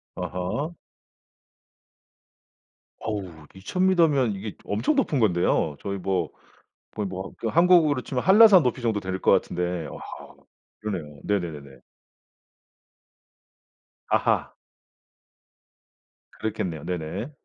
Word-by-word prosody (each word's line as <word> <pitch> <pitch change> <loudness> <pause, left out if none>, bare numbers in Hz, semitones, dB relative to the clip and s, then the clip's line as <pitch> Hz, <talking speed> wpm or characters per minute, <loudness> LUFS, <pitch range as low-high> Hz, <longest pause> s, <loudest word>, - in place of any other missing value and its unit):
아하. 95 - -3 2.3
어우 95 -8 -6
2,000 180 - 0
미터면 150 - +3
이게 100 +2 -6
엄청 290 - 0
높은 210 - +1
건데요. 85 -7 +2
저희 100 0 -4
뭐 90 -3 -1 0.7
거의 105 -2 -2
뭐 95 0 -6
그 115 - -3
한국으로 165 -2 +4
치면 125 0 -3
한라산 195 -2 +8
높이 125 0 -1
정도 110 -3 0
될 95 -1 -4
것 - - +3
같은데 90 -2 0
아 - - -9 0.8
그러네요. 85 -9 -5
네네네네. 80 -9 -3 2.3
아하. - - +1 1.9
그렇겠네요. 90 -8 -3
네네. 90 - -4
100 Hz, 205 characters per minute, -25 LUFS, 90-140 Hz, 2.3 s, 한라산